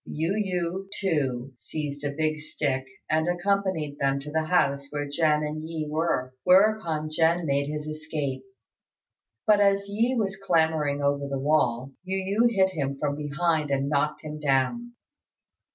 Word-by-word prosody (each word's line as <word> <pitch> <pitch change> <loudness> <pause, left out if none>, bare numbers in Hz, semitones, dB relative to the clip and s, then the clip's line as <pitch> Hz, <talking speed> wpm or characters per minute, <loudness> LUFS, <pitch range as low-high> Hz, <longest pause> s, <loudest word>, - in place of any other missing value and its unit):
Yu 165 +5 -2
yü, 190 -2 -2
too, 135 -9 -1
seized 145 +2 -5
a 145 - 0
big 155 -1 0
stick 135 -3 -2 0.2
and 160 +1 +1
accompanied 175 -5 0
them 140 -1 +1
to 150 +2 -8
the 160 +1 0
house 140 -5 +2
where 145 0 -3
Jen 150 0 +2
and 150 +1 -3
Yi 160 -2 -3
were; 150 -5 -1
whereupon 180 -6 +3
Jen 165 +2 +2
made 140 -1 +1
his 150 0 -4
escape; 155 -3 -4 1.0
but 210 -1 +5
as 200 0 +3
Yi 230 +6 +1
was 195 -3 -1
clambering 160 -6 +1
over 140 0 +1
the 140 -1 -2
wall, 135 -3 +1
Yu 190 +1 -2
yü 200 +5 +2
hit 190 -3 +3
him 140 -5 -2
from 145 0 -1
behind 150 +1 0
and 140 0 0
knocked 150 +1 0
him 155 0 -6
down. 150 - 0
155 Hz, 155 wpm, -26 LUFS, 140-180 Hz, 1.0 s, but